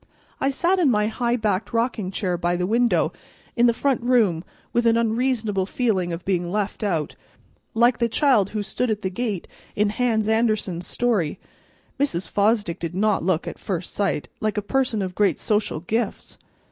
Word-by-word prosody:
I 270 - +1
sat 350 +7 +1
in 325 -6 +4
my 210 -3 +2
high 235 +2 0
backed 210 -3 -1
rocking 230 -4 0
chair 185 -2 -1
by 175 0 0
the 180 0 -1
window 235 +4 +2 0.4
in 240 0 +5
the - - +5
front 265 +2 0
room 225 -9 +2 0.3
with 240 0 +2
an 230 0 +4
unreasonable 225 -4 0
feeling 200 -7 0
of 170 +1 -5
being 175 -2 0
left 205 +1 -2
out, 165 -7 -1 0.6
like 240 +2 +4
the 235 -1 +2
child 235 -7 +3
who 215 -1 -3
stood 250 +4 -2
at 215 -1 -2
the 190 - -1
gate 205 -3 -3 0.3
in 205 0 +2
Hans 220 -2 +1
Andersen's 215 -6 0
story. 215 -11 0 0.6
Mrs. 195 -11 0
Fosdick 205 -4 +1
did 170 +1 -4
not 210 -1 +1
look, 175 -2 0
at - - -6
first 180 -3 -4
sight, 195 -7 -1
like 215 -1 -1
a 210 - 0
person 245 -3 0
of 185 -1 -4
great 195 -4 +2
social 210 -7 -1
gifts. 220 +4 -3
215 Hz, 180 wpm, -23 LUFS, 185-235 Hz, 0.6 s, in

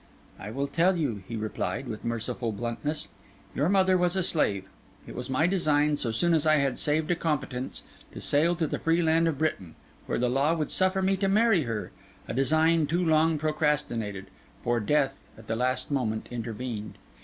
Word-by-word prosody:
'I 100 - -7
will 140 +2 -1
tell 175 +5 +2
you,' 120 - -2
he 115 - -5
replied, 110 +4 -3
with 110 -3 -6
merciful 115 0 -2
bluntness. 120 +8 -3 0.4
'Your 145 +5 +1
mother 190 -1 +4
was 180 +1 +2
a 190 - +1
slave; 100 - +1 0.4
it - - -9
was 125 - -6
my 130 +4 +2
design, 150 -5 +2
so 125 - -3
soon 170 +10 +1
as 160 -1 +2
I 155 - +6
had 140 -3 0
saved 155 +2 0
a - - +3
competence, 140 -6 -3 0.3
to - - -8
sail 165 +4 +2
to 165 -1 0
the - - -3
free 165 +1 +2
land 165 +1 +3
of 160 -4 -1
Britain, 115 - -2 0.3
where - - -1
the 125 - +1
law 140 +6 +2
would 155 -3 -2
suffer 190 0 +2
me 195 +1 +2
to 195 +1 0
marry 200 - +3
her: 115 -2 -4 0.4
a - - -4
design 160 +4 +3
too 175 +4 0
long 160 0 +3
procrastinated; 145 -10 -1 0.4
for 120 0 +1
death, 135 +4 +1 0.2
at 110 - -13
the 115 - -2
last 130 +3 0
moment, 110 -6 -1
intervened. 115 -2 -5
145 Hz, 190 wpm, -27 LUFS, 120-165 Hz, 0.4 s, I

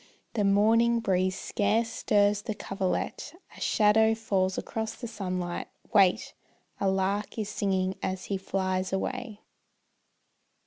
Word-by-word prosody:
The 215 -3 0
morning 225 +4 +4
breeze 185 -3 +1
scarce 215 +3 +1
stirs 205 0 +2
the 215 0 -4
coverlet, 195 - -3 0.2
A - - -13
shadow 220 +1 +4
falls 190 -4 0
across 220 -1 -3
the 240 - -6
sunlight; 185 -5 -4 0.3
wait! 195 -4 +4 0.5
A 195 - +2
lark 195 +3 -1
is 215 -2 -2
singing 190 -2 0
as 185 0 -3
he 200 - -2
flies 190 -1 -2
away. 205 +2 -3
200 Hz, 125 wpm, -28 LUFS, 190-220 Hz, 0.5 s, morning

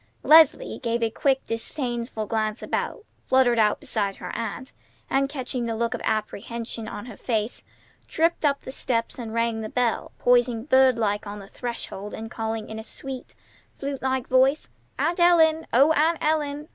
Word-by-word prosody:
Leslie 315 -1 +5
gave 235 -2 -1
a 225 - +1
quick, 270 +3 +1
disdainful 235 -1 -3
glance 215 0 -2
about, 445 - -3 0.2
fluttered 250 -3 +4
out 210 -1 +3
beside 210 -8 -1
her - - -7
aunt, 230 +3 -5 0.4
and, 275 0 +2
catching 255 -3 -3
the 225 - -2
look 235 +1 -1
of - - -4
apprehension 225 +1 -3
on 205 -1 -7
her 245 -4 -9
face, 220 0 -2 0.5
tripped 330 +1 +1
up 280 -2 +2
the - - -8
steps 235 -2 -2
and 230 -2 -5
rang 230 0 0
the 215 - -5
bell, 245 -1 0
poising 245 -2 +3
bird 260 -3 +5
like 210 -2 -1
on 205 +1 -6
the 200 -1 -10
threshold 210 -4 -6
and 225 +1 -7
calling 220 -1 -3
in 220 0 -6
a - - -7
sweet, 260 +2 -8 0.4
flute 275 -1 -4
like 260 -1 -1
voice: 260 +3 +3 0.3
"Aunt 345 +2 0
Ellen! 320 -2 +4
O 280 +6 +5
Aunt 320 +2 +3
Ellen! 300 -1 -1
240 Hz, 170 wpm, -25 LUFS, 225-275 Hz, 0.5 s, Leslie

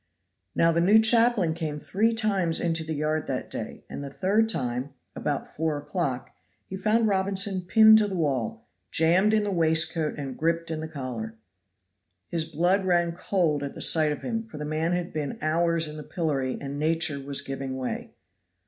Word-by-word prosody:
Now 165 0 +4
the 170 +1 +1
new 200 +5 +6
chaplain 225 -5 +4
came 160 -3 -4
three 210 +9 +1
times 200 -7 +1
into 165 -1 0
the 160 0 -4
yard 155 +1 -1
that - - -4
day, - - -6
and - - -7
the 140 - -6
third 205 +9 +1
time, 130 - -2 0.2
about 145 -2 -2
four 160 -1 -2
o'clock, 145 -3 -3 0.3
he 190 - -7
found 215 +4 +2
Robinson 195 -1 +1
pinned 220 +4 +7
to 210 - +1
the 195 - -4
wall, 135 -9 -2 0.2
jammed 175 - +3
in 215 -1 +2
the 205 - -2
waistcoat 160 -2 +1
and 135 -3 -5
griped 165 +1 -1
in 160 - -3
the 160 - -5
collar. 125 -7 -6 0.9
His 165 -2 0
blood 175 +5 +1
ran 175 -2 +2
cold 170 -4 0
at 140 -1 -6
sight 155 -2 +3
of 150 - -5
him, 225 -2 -2
for 225 -9 -11
the 150 - -4
man 155 +3 -1
had 175 0 -3
been 150 -3 -3
hours 165 +1 +1
in 150 0 -8
the 150 - -7
pillory 140 -5 -2
and 140 0 -5
nature 160 -2 0
was 140 0 -2
giving 135 -1 -5
way. 130 -1 -5
165 Hz, 185 wpm, -26 LUFS, 145-190 Hz, 0.9 s, pinned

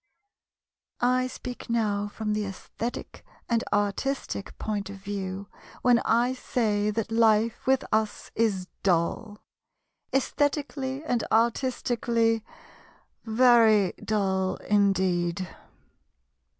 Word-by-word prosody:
I 255 +1 +2
speak 250 -1 -8
now 210 -3 0
from 210 0 -3
the 210 0 0
aesthetic 200 +4 -6 0.2
and 230 -1 +1
artistic 205 +2 -1
point 205 -2 -3
of 200 - -7
view 195 0 -5 0.4
when 245 -1 +5
I 240 +3 +2
say 215 -5 0
that 225 +1 -2
life 225 +1 +2
with 265 0 +3
us 215 -1 -1
is 200 -5 0
dull; 200 +4 0 0.7
aesthetically 280 0 -1
and 245 -6 0
artistically, 230 -1 +1 0.8
very 225 -4 +5
dull 190 -3 0
indeed. 185 -3 +1
220 Hz, 95 wpm, -27 LUFS, 200-240 Hz, 0.8 s, when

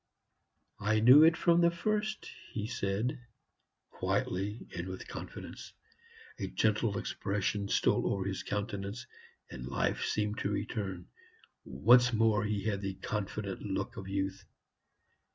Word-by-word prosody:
"I 110 +1 +2
knew 125 +7 +9
it 160 0 +6
from 170 0 +4
the 170 - +6
first," 215 +5 -2 0.3
he 105 - -2
said, 115 +4 -1 0.7
quietly 100 +5 -2
and 85 +1 -4
with 95 0 -7
confidence. - - -8 0.7
A - - -2
gentle - - +1
expression 100 0 -2
stole - - +2
over 100 -1 -1
his 95 -1 -2
countenance, 100 +2 -4 0.5
and 65 -1 -7
life - - 0
seemed 105 0 -1
to 100 - -1
return. 100 -4 -3 0.6
Once 120 - +5
more 110 -2 +3
he 105 -2 -1
had 100 -3 -1
the 95 -1 -3
confident 100 -1 -4
look 100 -2 -3
of 95 - -7
youth. 95 0 -2
105 Hz, 130 wpm, -32 LUFS, 95-115 Hz, 0.7 s, knew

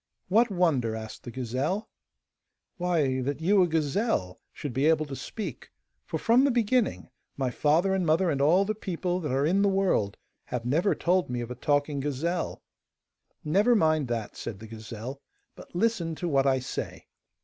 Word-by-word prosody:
'What 230 +5 +4
wonder?' 155 - +1
asked 110 -1 -8
the - - -5
gazelle. 130 - -2 0.9
'Why, 160 -8 +1
that 140 +3 -2
you, 190 +4 +4
a 180 - +4
gazelle, 160 - 0
should 145 -4 -6
be 135 +5 +2
able 155 -1 +3
to 140 -2 -6
speak, 215 - -6 0.4
for, - - -2
from 235 +3 +4
the 280 - +4
beginning, 240 - +1 0.3
my 130 -2 0
father 165 +9 +2
and 190 -1 +1
mother 165 +2 +2
and 140 -2 -1
all 175 +7 +4
the 215 - -1
people 180 -3 -2
that 150 -7 -3
are 135 +2 +1
in 185 +5 +3
the 200 - +4
world 190 - +1 0.3
have 120 -2 -4
never 165 +10 +2
told 180 -2 +1
me 125 0 -2
of 120 0 -5
a - - -4
talking 145 +2 0
gazelle.' 150 +5 -2 0.8
'Never 205 +10 +4
mind 155 - +2
that,' 115 -3 -3
said 110 - -6
the 110 - -10
gazelle, 115 +4 -8 0.3
'but - - -14
listen 175 -5 0
to 175 - -3
what 140 -3 +2
I 130 -1 +2
say! 125 - -5
155 Hz, 180 wpm, -27 LUFS, 130-190 Hz, 0.9 s, What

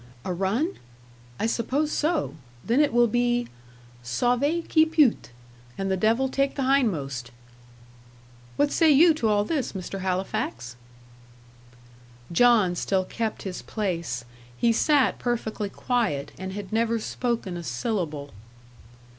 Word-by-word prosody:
"A 185 - -1
run? 205 - -1 0.6
I - - 0
suppose 260 +7 0
so. 315 +1 0 0.3
Then 240 +4 +2
it 300 -1 +4
will 240 +1 +5
be 240 +1 0 0.5
'Sauve 250 - 0
qui 315 - +5
peut,' 315 -6 +2 0.5
and 195 0 -2
the - - +2
devil 225 +7 +2
take 275 +1 0
the 275 - -1
hindmost." 160 - 0 1.3
"What 290 0 +2
say 325 -2 +4
you 320 +4 +7
to 270 -8 -1
all 205 -1 +3
this, 290 -3 -2
Mr. 195 0 -5
Halifax?" 180 -10 -3 1.6
John 210 -2 +4
still 190 +1 0
kept 225 +2 -3
his 185 -2 -5
place. 170 - -3 0.3
He 235 -1 +3
sat 285 +3 +2
perfectly 220 -4 -2
quiet, 205 - -1
and 190 0 -6
had 205 0 -7
never 230 +1 +1
spoken 230 -4 -3
a 175 - -5
syllable. 150 - -3
225 Hz, 130 wpm, -25 LUFS, 185-265 Hz, 1.6 s, you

